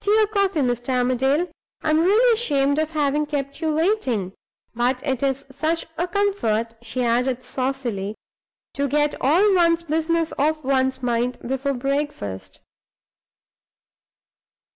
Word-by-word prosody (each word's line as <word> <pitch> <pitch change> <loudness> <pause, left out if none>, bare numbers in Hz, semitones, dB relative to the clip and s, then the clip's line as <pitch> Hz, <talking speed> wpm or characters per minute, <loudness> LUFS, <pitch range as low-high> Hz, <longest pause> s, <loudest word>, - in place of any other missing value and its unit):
Tea 415 +2 +4
or 430 - +5
coffee, 395 -6 0
Mr. 245 -1 -1
Armadale? 265 +6 +1 0.4
I'm 310 0 +3
really 430 +8 +4
ashamed 285 -10 +2
of 315 0 0
having 300 -1 0
kept 280 0 -4
you 320 -1 +1
waiting. 270 - 0 0.4
But 250 +3 0
it 265 -4 -1
is 275 -1 -1
such 315 +4 -1
a 345 +2 -1
comfort," 340 - 0
she 250 +1 -3
added, 250 +2 +1
saucily, 250 -6 -3 0.6
"to 280 0 -1
get 295 +2 +1
all 365 +10 +4
one's 340 -2 +3
business 325 +1 0
off 310 +2 +1
one's 260 -1 0
mind 245 +1 0
before 270 +2 -1
breakfast!" 275 - -3
280 Hz, 130 wpm, -22 LUFS, 250-325 Hz, 0.6 s, or